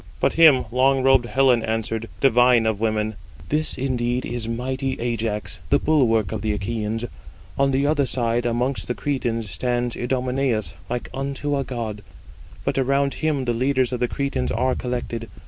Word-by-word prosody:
But - - +2
him 155 -6 +6
long 130 +2 +3
robed 135 -2 +4
Helen 130 -2 +3
answered, 115 0 -2
divine 125 -2 +5
of 110 -2 0
women: 110 -1 0 0.3
"This 155 +1 -1
indeed 125 -1 -1
is 120 -1 -3
mighty 130 +3 -2
Ajax, 115 -3 -3
the 140 - +5
bulwark 120 -9 +2
of 110 -2 -3
the 105 -1 -1
Achæans: 110 +2 -3 0.5
on 140 0 +2
the 135 +1 +1
other 145 -2 +2
side, 120 -1 0
amongst 125 +3 -1
the 125 - -2
Cretans, 115 -7 -2
stands 120 -1 -1
Idomeneus 125 -2 -1 0.2
like 120 0 -3
unto 140 +2 -2
a 140 - 0
god: 115 -5 -5 0.6
but - - 0
around 140 +1 +1
him 150 -4 -1
the 120 - +1
leaders 130 +1 +1
of 125 - -2
the 125 - +1
Cretans 140 -1 -2
are 130 +4 +1
collected. 120 -2 -4
125 Hz, 165 wpm, -23 LUFS, 115-135 Hz, 0.6 s, him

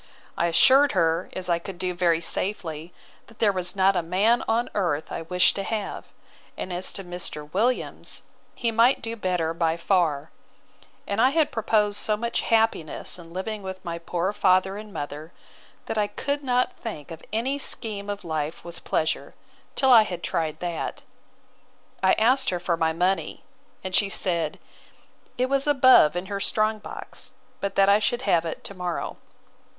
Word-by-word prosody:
I 170 - +1
assured 270 - +5
her, 165 +2 +1
as 185 -1 -4
I 170 -1 +2
could 180 +1 -8
do 185 0 -1
very 170 -2 +2
safely, 170 -3 -3 0.4
that 225 - -18
there 210 -2 +3
was 185 -1 -1
not 195 0 +4
a 175 - +2
man 195 +8 +2
on 230 +2 +1
earth 165 -6 -1
I - - -4
wished 180 +2 +3
to 195 - -2
have: 215 0 -4 0.5
and 185 - -4
as 180 +1 -3
to 195 - -6
Mr. 175 -4 -4
Williams, 235 +6 -1 0.3
he 235 -2 0
might 230 +4 +3
do 230 0 -3
better 180 -6 -1
by 165 -1 0
far: 165 -5 +1 0.7
and 200 +2 0
I 255 - +6
had 310 +1 +2
proposed 210 -2 +1
so 215 -1 0
much 235 +2 -1
happiness 220 -7 +1
in 165 -1 -12
living 205 +4 -4
with 190 -1 -8
my 170 -1 -4
poor 175 +3 -2
father 190 -1 +3
and 210 0 -9
mother, 150 0 -6 0.5
that 220 - -2
I 205 - +2
could 285 +7 -3
not 250 -1 +1
think 170 - -7
of 160 -1 -8
any 255 +6 -1
scheme 205 -6 -3
of 205 -2 -5
life 155 0 -3
with 170 -1 -10
pleasure, 160 - -1 0.4
till 265 -1 +4
I 235 -3 +9
had 180 -5 -4
tried 160 -2 -2
that. 175 -2 -4 1.0
I 190 - +4
asked 255 +4 +3
her 180 - -1
for 175 -1 0
my 160 -1 +1
money; 180 +4 -1 0.4
and 185 0 -5
she 200 +1 +4
said, 170 -5 0 0.8
it 250 - +2
was 275 +1 +1
above 260 - +6
in 180 +1 -2
her 200 0 -4
strong 215 +2 +1
box, - - -7 0.3
but 200 - -3
that 195 0 +5
I 200 +1 +6
should 240 +4 0
have 170 -8 +2
it 165 - -5
to - - -5
morrow. 180 -2 -4
190 Hz, 175 wpm, -25 LUFS, 170-220 Hz, 1.0 s, I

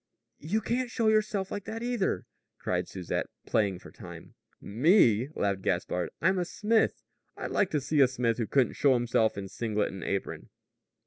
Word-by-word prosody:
"You 200 +9 -1
can't 245 +3 -1
show 230 -2 +1
yourself 210 -3 +1
like 205 - -4
that, 225 +2 -5
either," 235 - -1 0.3
cried - - -2
Susette, 90 -3 -3 0.2
playing 100 -4 +1
for - - -13
time. - - -11 0.3
"Me?" 125 - +3
laughed 100 -1 0
Gaspard. 90 -1 -1
"I'm 185 +2 +2
a - - +1
smith. 220 +5 +1 0.3
I'd - - -5
like 195 - +2
to 155 - 0
see 145 +1 +1
a 135 - +7
smith 125 -2 -1
who 115 - -1
couldn't 135 -3 +2
show 140 -2 +3
himself 115 -3 +1
in 100 -1 -4
singlet 105 +1 -2
and 95 - -7
apron!" 100 -1 -3
135 Hz, 175 wpm, -29 LUFS, -, 0.3 s, a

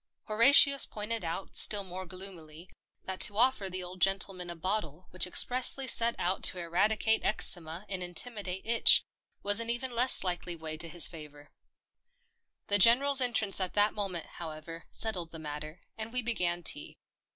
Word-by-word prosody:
Horatius 275 +5 +5
pointed 215 +1 -5
out 170 +3 -7
still 205 -2 +4
more 185 0 -9
gloomily 175 -3 -12 0.4
that 190 -1 -7
to 205 - 0
offer 240 -5 +1
the 185 0 -6
old 180 +1 -12
gentleman 195 -2 -1
a 170 - -7
bottle 180 -2 -5
which 185 0 -2
expressly 255 +7 +4
set 235 -1 +5
out 185 +2 -3
to 185 - +4
eradicate 210 +6 -1
eczema 175 -3 -2
and 190 -2 -7
intimidate 190 +1 -2
itch 230 +1 +3 0.4
was 205 +1 +1
an 230 0 0
even 240 +2 -1
less 245 -1 +5
likely 175 -1 -4
way 160 -1 -8
to 165 +1 -5
his 170 +1 +1
favour. 150 -4 -14 1.1
The 205 0 +1
General's 265 +6 +4
entrance 220 -6 +1
at 185 - -5
that 205 0 +1
moment, 190 -5 -5
however, 165 0 -11
settled 185 -7 -2
the 165 - -12
matter, 155 +1 -9 0.2
and 220 +1 -7
we 250 0 0
began 175 -7 -2
tea. 145 - -3
190 Hz, 165 wpm, -28 LUFS, 170-220 Hz, 1.1 s, Horatius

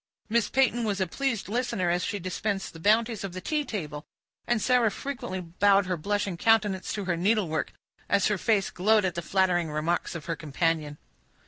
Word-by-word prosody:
Miss 230 0 +2
Peyton 245 -3 +2
was 205 -3 -1
a 190 - +2
pleased 235 +4 -2
listener, 215 -5 0
as 175 +1 0
she 205 - -2
dispensed 195 +2 -3
the 165 - -11
bounties 220 +4 +2
of 195 -3 -5
the 185 - -5
tea 300 +10 -1
table, 155 - -5 0.4
and 240 -1 +2
Sarah 245 0 +3
frequently 245 -5 -5
bowed 195 +3 +3
her 180 0 -1
blushing 200 +2 -2
countenance 210 -2 +2
to 205 -2 -3
her 175 -2 0
needlework, 180 -3 0 0.4
as 200 0 +3
her 210 -3 +1
face 205 -2 +1
glowed 210 +2 +3
at 180 - 0
the 170 - -3
flattering 175 -2 +1
remarks 160 +4 -1
of 160 - -6
her 165 - -2
companion. 155 -1 -1
195 Hz, 190 wpm, -27 LUFS, 175-220 Hz, 0.4 s, Sarah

